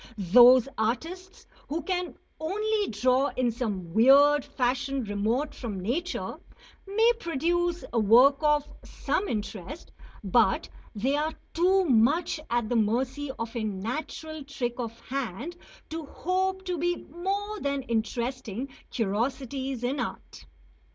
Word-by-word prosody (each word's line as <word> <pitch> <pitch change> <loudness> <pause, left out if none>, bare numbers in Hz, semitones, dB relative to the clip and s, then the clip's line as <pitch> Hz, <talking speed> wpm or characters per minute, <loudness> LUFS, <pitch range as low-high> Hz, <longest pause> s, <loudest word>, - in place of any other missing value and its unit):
Those 240 +6 +7
artists 330 - -3 0.2
who 315 +2 -3
can 360 0 -2 0.2
only 420 +6 0
draw 255 +5 +2
in 250 -2 +2
some 205 -8 -4
weird 280 +6 +6
fashion 260 +1 -1
remote 220 +8 -1
from 215 -6 -5
nature 305 - -3 0.5
may 445 +4 +4
produce 345 - 0
work 240 +5 +6
of 295 -1 +2 0.2
some 410 - -2
interest; 215 - -5 0.3
but - - +2 0.3
they 260 +7 +1
are 305 +2 -1 0.2
too 370 +3 +3
much 285 +6 +3
at 235 -2 0
the 245 - -1
mercy 250 +6 0
of 230 +1 -5
a 230 - -2
natural 255 +9 -4
trick 250 -3 -4
of 230 -1 -5
hand 270 - -4 0.4
to 320 -2 -5
hope 375 +4 -1
to 360 -3 -2
be 350 +2 +1
more 400 +7 -4
than 280 -3 -2
interesting 240 +1 -3 0.2
curiosities 260 +4 -2
in 260 +4 -1
art. - - -6
270 Hz, 125 wpm, -27 LUFS, 235-330 Hz, 0.5 s, Those